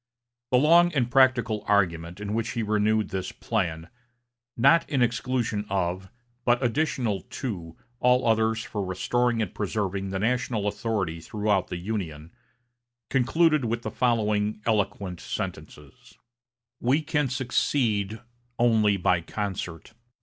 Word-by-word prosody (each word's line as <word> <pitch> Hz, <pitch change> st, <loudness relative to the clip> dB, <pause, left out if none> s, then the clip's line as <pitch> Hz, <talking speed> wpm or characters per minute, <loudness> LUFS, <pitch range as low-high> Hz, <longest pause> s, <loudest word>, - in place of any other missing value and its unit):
The 125 Hz, -, +4 dB
long 170 Hz, +5 st, +5 dB
and 125 Hz, -4 st, 0 dB
practical 125 Hz, -5 st, +3 dB
argument 85 Hz, -3 st, +1 dB
in 105 Hz, 0 st, -4 dB
which 115 Hz, +2 st, -1 dB
he 115 Hz, -, -1 dB
renewed 105 Hz, 0 st, +1 dB
this 95 Hz, -1 st, -3 dB
plan, 85 Hz, -7 st, -2 dB, 0.7 s
"not 140 Hz, +8 st, +4 dB
in 135 Hz, -5 st, +2 dB
exclusion 120 Hz, -3 st, -1 dB
of, 95 Hz, 0 st, -2 dB, 0.3 s
but 120 Hz, +2 st, +2 dB
additional 120 Hz, -, 0 dB
to, 90 Hz, -12 st, -6 dB, 0.2 s
all 125 Hz, 0 st, +3 dB
others 110 Hz, 0 st, +2 dB
for 105 Hz, -2 st, -4 dB
restoring 115 Hz, +5 st, 0 dB
and 100 Hz, -, -6 dB
preserving 100 Hz, -2 st, -2 dB
the 95 Hz, -, -2 dB
national 115 Hz, 0 st, 0 dB
authority 100 Hz, -6 st, -2 dB
throughout 105 Hz, 0 st, 0 dB
the 90 Hz, -, -4 dB
Union," 85 Hz, -5 st, -5 dB, 0.8 s
concluded 155 Hz, +3 st, +3 dB
with 115 Hz, +1 st, -2 dB
the -, -, -4 dB
following 105 Hz, -4 st, +1 dB
eloquent 100 Hz, -4 st, -1 dB
sentences: 125 Hz, +12 st, -7 dB, 0.6 s
"We 135 Hz, +6 st, +2 dB
can 150 Hz, -1 st, 0 dB
succeed 115 Hz, -4 st, 0 dB, 0.4 s
only 110 Hz, -4 st, +3 dB
by 90 Hz, -1 st, +2 dB
concert. 95 Hz, 0 st, -5 dB
110 Hz, 125 wpm, -26 LUFS, 95-125 Hz, 0.8 s, long